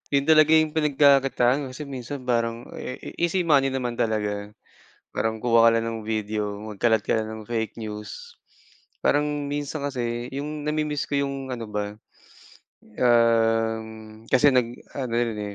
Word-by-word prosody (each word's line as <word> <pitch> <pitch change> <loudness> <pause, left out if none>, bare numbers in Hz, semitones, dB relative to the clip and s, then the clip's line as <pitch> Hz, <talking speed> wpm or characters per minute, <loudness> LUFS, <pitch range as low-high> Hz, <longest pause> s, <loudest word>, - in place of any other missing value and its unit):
Yun 140 0 +1
talaga 155 -1 +6
yung 155 -1 +4
pinagkakakitaan. 140 -3 +3
Kasi 145 +3 -8
minsan 130 0 -7
parang 115 -1 -1 0.5
easy 175 +1 0
money 135 -3 +4
naman 125 -2 -2
talaga. 105 -2 -1 0.6
Parang 110 0 -2
kuha 115 -1 +4
ka 115 - +2
lang 115 - -3
ng 115 -1 -4
video, 105 -1 -2
magkalat 110 +1 +1
ka 105 - 0
lang 110 0 -2
ng 110 0 -7
fake 115 -1 -3
news, 110 - -8 0.7
parang 145 0 +3 0.2
minsan 145 +1 -3
kasi 120 -3 -3
yung 145 +2 -5
nami-miss 150 -1 -1
ko 145 - -1
yung 135 -1 -5
ano 120 -2 -4
ba, 105 0 -4 1.0
um, 115 -2 +1
kasi 130 +3 +5
nag-ano 125 +1 -2
yun 115 -2 0
eh, 105 -1 -5
120 Hz, 145 wpm, -25 LUFS, 110-140 Hz, 1.0 s, talaga